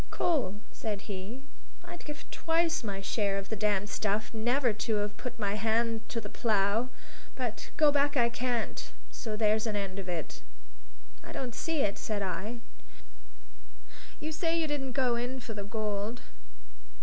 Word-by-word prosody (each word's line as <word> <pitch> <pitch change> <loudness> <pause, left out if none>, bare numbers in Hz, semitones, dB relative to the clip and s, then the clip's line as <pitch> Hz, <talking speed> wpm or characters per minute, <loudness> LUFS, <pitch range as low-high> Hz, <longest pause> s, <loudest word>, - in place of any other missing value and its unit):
"Cole," 275 - +2 0.2
said 210 -3 -3
he, 205 +6 -5 0.4
"I'd 345 0 -8
give 300 +1 -6
twice 330 -2 +2
my 200 -3 -2
share 195 0 +1
of 195 0 -4
the 220 - 0
damned 205 -1 +2
stuff 215 +1 0
never 240 +2 +3
to 215 +1 0
have 205 0 0
put 250 -1 -5
my 205 -3 +1
hand 225 +1 +1
to 230 - -1
the 210 - -5
plough; 215 +2 +2 0.5
but 245 -4 -3
go 300 -2 +7
back 285 0 +3
I 235 -1 +6
can't; 240 -1 -1 0.2
so 220 -3 -3
there's 215 +1 +3
an 215 - 0
end 195 -1 -1
of 185 -2 -5
it." 170 -4 -3 0.8
"I - - -8
don't 250 -3 -3
see 320 +4 0
it," 200 -4 +1
said 210 -2 -1
I. 200 +6 -2 1.6
"You 310 +1 -3
say 330 +1 +1
you 325 - +2
didn't 280 -4 -1
go 255 -3 +3
in 250 +2 -2
for 240 -2 -5
the 205 -1 -4
gold? 210 +1 -2
225 Hz, 165 wpm, -31 LUFS, 205-260 Hz, 1.6 s, go